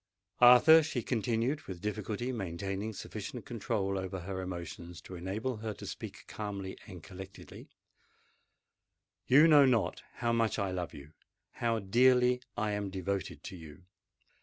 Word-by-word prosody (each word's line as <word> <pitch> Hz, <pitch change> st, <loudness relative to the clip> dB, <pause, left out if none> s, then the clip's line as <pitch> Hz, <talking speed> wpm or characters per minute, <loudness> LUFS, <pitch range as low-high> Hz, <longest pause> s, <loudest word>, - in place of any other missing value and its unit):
"Arthur," 125 Hz, +7 st, +9 dB
she 145 Hz, -6 st, -3 dB
continued, 120 Hz, +6 st, 0 dB
with 95 Hz, -3 st, -6 dB
difficulty 105 Hz, +4 st, -3 dB
maintaining 100 Hz, 0 st, -3 dB
sufficient 110 Hz, +3 st, -7 dB
control 100 Hz, -4 st, -2 dB
over 95 Hz, 0 st, -5 dB
her 95 Hz, +1 st, -4 dB
emotions 85 Hz, -1 st, -7 dB
to -, -, -11 dB
enable 100 Hz, +8 st, -3 dB
her 110 Hz, -1 st, -5 dB
to -, -, -9 dB
speak -, -, -8 dB
calmly 100 Hz, -3 st, -5 dB
and 90 Hz, -5 st, -10 dB
collectedly, 95 Hz, +1 st, -11 dB, 1.6 s
"you 145 Hz, +5 st, +7 dB
know 150 Hz, -3 st, +8 dB
not 110 Hz, -9 st, +1 dB
how 120 Hz, -1 st, 0 dB
much 115 Hz, -3 st, +1 dB
I 100 Hz, -1 st, -1 dB
love 90 Hz, -2 st, -4 dB
you—how 80 Hz, +10 st, -5 dB
dearly 125 Hz, +4 st, +4 dB, 0.2 s
I 110 Hz, -2 st, 0 dB
am 105 Hz, -1 st, -2 dB
devoted 95 Hz, 0 st, -3 dB
to -, -, -7 dB
you. 80 Hz, 0 st, -12 dB
105 Hz, 135 wpm, -32 LUFS, 95-120 Hz, 1.6 s, Arthur